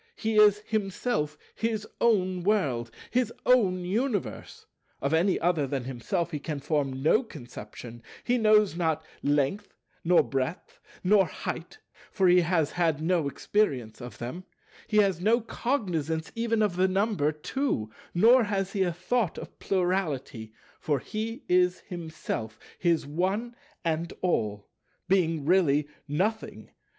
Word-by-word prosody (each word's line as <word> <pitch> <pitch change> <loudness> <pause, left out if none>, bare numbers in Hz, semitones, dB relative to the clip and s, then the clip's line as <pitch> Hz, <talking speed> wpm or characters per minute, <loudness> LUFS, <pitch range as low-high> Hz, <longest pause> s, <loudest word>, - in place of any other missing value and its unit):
He 220 -1 -1
is 210 -1 +6
himself 195 -6 -1 0.2
his 220 -2 -2
own 185 -6 +2
World, 145 - +1 0.2
his 245 -1 +1
own 190 -8 +3
Universe; 200 - -2 0.3
of 140 +3 -1
any 180 +4 +3
other 165 -5 +1
than 135 -1 -2
himself 135 +8 -2
he 150 - -3
can 150 0 -4
form 135 -2 -1
no 190 - +4
conception; 120 - -10 0.2
he 245 0 +1
knows 215 -4 +4
not 160 -2 0 0.2
Length, 145 +8 0 0.3
nor 175 +1 +5
Breadth, 135 +5 -4 0.2
nor 195 +1 +4
Height, - - -6 0.3
for 190 -2 +2
he 180 0 +6
has 165 -3 +1
had 165 -4 +1
no 165 -1 +1
experience 140 - -1
of 120 0 -8
them; 160 +10 -6 0.4
he 210 - 0
has 195 -4 +3
no 225 +5 +4
cognizance 180 - -2
even 230 -1 +1
of 190 -4 0
the 185 +1 +4
number 190 -5 +1
Two; 155 - -2 0.2
nor 230 +6 +6
has 195 -2 -2
he 200 - 0
a 180 -2 +2
thought 180 +3 -1
of - - -9
Plurality; 170 - -1 0.3
for 145 -2 0
he 225 - -5
is 180 0 +3
himself 160 - -5 0.2
his 170 -3 +2
One 190 +10 -1 0.3
and 165 +1 -1
All, 105 - -1 0.4
being 165 -6 +2
really 150 -4 +3 0.2
Nothing. 195 +10 -2
180 Hz, 140 wpm, -28 LUFS, 150-210 Hz, 0.4 s, is